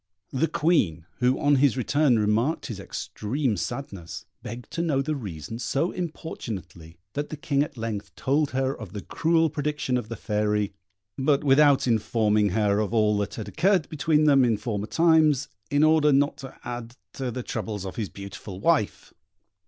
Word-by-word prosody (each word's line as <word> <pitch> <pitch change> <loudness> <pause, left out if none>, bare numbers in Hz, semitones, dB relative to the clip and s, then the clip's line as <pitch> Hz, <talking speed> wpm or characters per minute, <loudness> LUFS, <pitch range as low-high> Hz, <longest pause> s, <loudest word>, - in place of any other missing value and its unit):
The 150 +5 +1
Queen, 105 - +1
who 125 +1 +2
on 145 -1 +4
his 135 -2 +3
return 135 0 +3
remarked 110 +8 +1
his 110 -7 -5
extreme 115 +5 -2
sadness, 100 - -5 0.2
begged 120 +2 -8
to 170 - -2
know 155 -5 +1
the 155 +2 -1
reason 100 - -6
so 150 +7 0
importunately, 95 - -6 0.2
that 145 +4 -3
the 155 - -6
King 140 -1 0
at 145 -2 -3
length 105 -3 -5
told 140 +2 +1
her 135 +1 -1
of 105 -6 -9
the 105 - -6
cruel 165 0 +2
prediction 150 -3 -1
of 115 -3 -5
the 115 - -4
Fairy, 105 -2 0 0.5
but 140 +1 +2
without 140 0 +5
informing 110 -2 +2
her 105 +1 +2
of 110 +2 -1
all 105 -1 +3
that 100 - -3
had 110 - -6
occurred 185 -5 +2
between 155 0 +2
them 140 -3 +5
in 115 -3 +2
former 105 -1 -3
times, 155 -3 +3 0.2
in 145 +1 +3
order 155 -1 +5
not 140 +1 +3
to 135 -1 -10
add 120 0 -6 0.2
to 130 -2 -3
the 125 +1 -4
troubles 105 -5 -4
of 95 - -6
his 105 -5 -3
beautiful 100 +1 -8
wife. 150 -3 0
125 Hz, 175 wpm, -26 LUFS, 105-145 Hz, 0.5 s, without